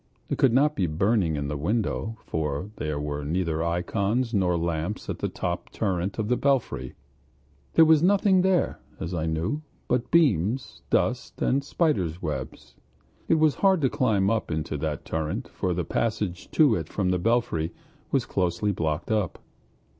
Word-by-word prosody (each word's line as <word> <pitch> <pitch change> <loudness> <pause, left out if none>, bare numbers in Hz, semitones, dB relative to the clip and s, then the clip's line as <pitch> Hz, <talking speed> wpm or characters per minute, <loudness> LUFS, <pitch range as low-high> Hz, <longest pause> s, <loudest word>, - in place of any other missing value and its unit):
It - - -2
could 135 - +5
not 145 +5 +3
be 90 - +1
burning 90 0 +1
at 70 0 -2
the 75 - -3
window, 110 +6 -1
for 80 +5 -3
there 75 -1 -2
were 75 0 -3
neither 80 +1 -1
ikons 100 +8 0
nor 90 -4 +2
lamps 85 +4 -2
in - - -3
the - - -1
top 85 0 -3
turret 95 -2 -2
of 110 -2 -1
the 125 - +2
belfry; 125 - 0 0.8
there 165 - +7
was 160 -1 +5
nothing 190 +1 +4
there, 185 -1 +1 0.2
as 85 - -4
I 80 -2 -1
knew, 85 - -1 0.3
but 125 -1 0
beams, 130 - +2
dust, - - 0
and 135 +2 +1
spiders' 100 - 0
webs. 75 -7 -5 0.5
It - - +4
was 155 -2 +4
hard 190 -2 +5
to 130 - +2
climb 105 -5 +2
up 115 -1 -1
into 80 -2 -2
that 75 0 -3
turret, 80 -1 -3
for 90 - -2
the 90 -1 -1
passage 105 -5 -2
to 150 -7 +4
it 80 -5 -2
from 95 -3 -1
the 90 - +1
belfry 90 -6 +1 0.4
was - - +2
closely 90 +2 0
blocked 80 -1 -2
up. 105 -5 0
95 Hz, 170 wpm, -26 LUFS, 80-120 Hz, 0.8 s, there